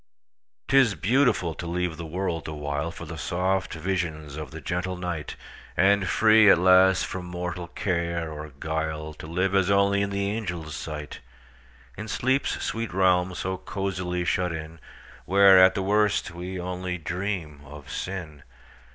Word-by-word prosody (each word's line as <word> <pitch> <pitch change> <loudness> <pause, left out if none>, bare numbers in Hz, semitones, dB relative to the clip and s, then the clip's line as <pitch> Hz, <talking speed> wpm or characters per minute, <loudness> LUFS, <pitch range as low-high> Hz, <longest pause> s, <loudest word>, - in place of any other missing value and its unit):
'T - - +1
is 125 -7 +5
beautiful 120 - +2
to 85 - -7
leave 90 -1 -2
the 85 +1 -7
world 85 0 -3
awhileFor 75 +2 -4
the - - -7
soft 95 +1 -1
visions 80 -4 -3
of 75 -2 -6
the - - -8
gentle 90 +1 -3
night; 85 -4 -4 0.4
And 100 0 +4
free, 110 +2 +6
at - - +7
last, 95 +1 +5
from 90 -1 -6
mortal 90 0 -5
care 85 -3 -2
or 75 0 -7
guile, 80 -1 -3
To 80 - -10
live 90 +4 0
as 95 -1 +3
only 100 0 +3
in 100 - 0
the 100 0 -1
angels' 90 -8 -4
sight, 75 -2 -6 0.8
In 105 - -6
sleep's 130 +5 0
sweet 115 -1 -3
realm 90 -1 +3
so 95 +1 -3
cosily 90 -3 -3
shut 90 0 0
in, 80 0 -7 0.5
Where, 95 -1 +7
at 95 0 +5
the 95 - -1
worst, 105 -2 +1
we 90 +2 -6
only 90 0 -4
dream 90 -3 -4
of 75 -1 -11
sin! 80 -6 -5
90 Hz, 155 wpm, -26 LUFS, 80-95 Hz, 0.8 s, at